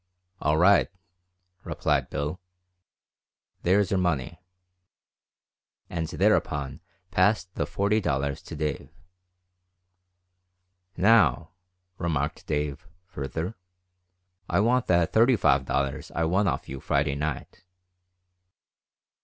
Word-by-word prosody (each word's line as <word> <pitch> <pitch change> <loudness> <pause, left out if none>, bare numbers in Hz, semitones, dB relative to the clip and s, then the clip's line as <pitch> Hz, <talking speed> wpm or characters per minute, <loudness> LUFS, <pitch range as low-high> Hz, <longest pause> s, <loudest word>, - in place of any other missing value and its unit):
"All 75 +2 +2
right," 100 +5 +5 0.8
replied - - -1
Bill, 75 +5 -3 1.2
"there's 95 +2 +2
your 95 - +2
money," 85 -2 -1 1.5
and 80 -2 -2
thereupon 70 0 0 0.3
passed 95 0 +2
the - - -2
forty 105 +2 +1
dollars 70 -5 -1
to - - -9
Dave. 75 -1 -3 2.1
"Now," 90 - +4 0.5
remarked 85 -3 -2
Dave, 75 -2 -3 0.2
further, 80 +2 -5 1.0
"I - - +2
want 120 +4 +2
that 85 -2 +2
thirty 120 +3 +5
five 70 -9 +2
dollars 70 +1 -2
I 85 - +1
won 95 +5 +2
off - - -2
you 65 - -6
Friday 70 +1 0
night." 75 +3 -5
85 Hz, 95 wpm, -26 LUFS, 70-95 Hz, 2.1 s, right